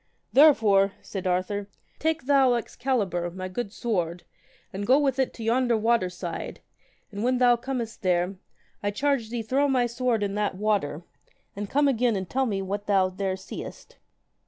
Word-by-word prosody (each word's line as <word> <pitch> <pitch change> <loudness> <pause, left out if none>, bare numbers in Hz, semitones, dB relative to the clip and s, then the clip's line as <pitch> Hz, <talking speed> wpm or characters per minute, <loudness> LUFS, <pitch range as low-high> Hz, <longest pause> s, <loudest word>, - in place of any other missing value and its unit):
Therefore, 210 -9 +5
said 190 -2 -5
Arthur, 185 +3 -1 0.3
take 320 0 0
thou 270 -3 +4
Excalibur, 225 -8 -1
my 185 +1 -6
good 200 +3 -4
sword, 175 -7 -2 0.5
and 200 +1 -4
go 260 - +6
with 275 -2 +1
it 265 - +1
to 230 - -7
yonder 240 +1 +2
water 225 -3 +2
side, 180 -1 -6 0.5
and 205 +1 -4
when 250 +1 +2
thou 245 -1 +5
comest 235 -2 -5
there, 180 +1 +1 0.4
I 205 - 0
charge 260 +1 0
thee 235 -1 -3
throw 270 +6 +1
my 255 -3 +2
sword 240 -2 0
in 200 -1 -2
that 205 -2 -1
water, 190 -6 -1 0.5
and 205 0 -5
come 290 +1 +3
again, 245 -3 +2
and 190 -2 -3
tell 265 +5 0
me 195 -3 -2
what 200 +2 -4
thou 190 -2 +3
there 190 0 -3
seest. 190 - -9
215 Hz, 170 wpm, -26 LUFS, 190-250 Hz, 0.5 s, go